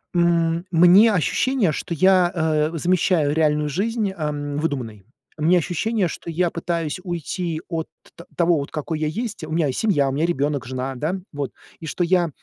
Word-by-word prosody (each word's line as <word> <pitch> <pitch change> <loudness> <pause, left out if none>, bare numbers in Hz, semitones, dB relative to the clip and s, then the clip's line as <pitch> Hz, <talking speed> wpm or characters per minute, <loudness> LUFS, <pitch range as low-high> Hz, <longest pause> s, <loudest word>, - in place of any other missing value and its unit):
М. 170 0 +2
Мне 180 +6 +7
ощущение, 205 - +1
что 170 +4 -4
я, 185 +1 +4
э, 155 -1 +1
замещаю 170 -3 +2
реальную 150 -1 +1
жизнь, 210 - -1
э, - - -10
м, 145 -3 -3
выдуманной. 120 -10 -3 0.3
У 155 - -4
меня 180 +3 +5
ощущение, 185 +5 0
что 170 - -7
я 170 +1 0
пытаюсь 170 -1 -3
уйти 170 -1 -3
от 165 -2 -3 0.3
т 170 - -12
того, 165 -5 +2
какой 155 +1 -4
я 155 - 0
есть. 215 +2 -4
У 155 - -6
меня 160 -2 +1
есть 130 - -2
семья, 165 -11 +2
у - - -2
меня 150 +4 0
ребенок, 145 -4 -1
жена, 130 +1 -4
да, 155 +9 -2 0.2
вот. 145 -2 -4 0.3
И 160 - -8
что 175 - -1
я 175 -1 +2
165 Hz, 185 wpm, -22 LUFS, 150-180 Hz, 0.3 s, Мне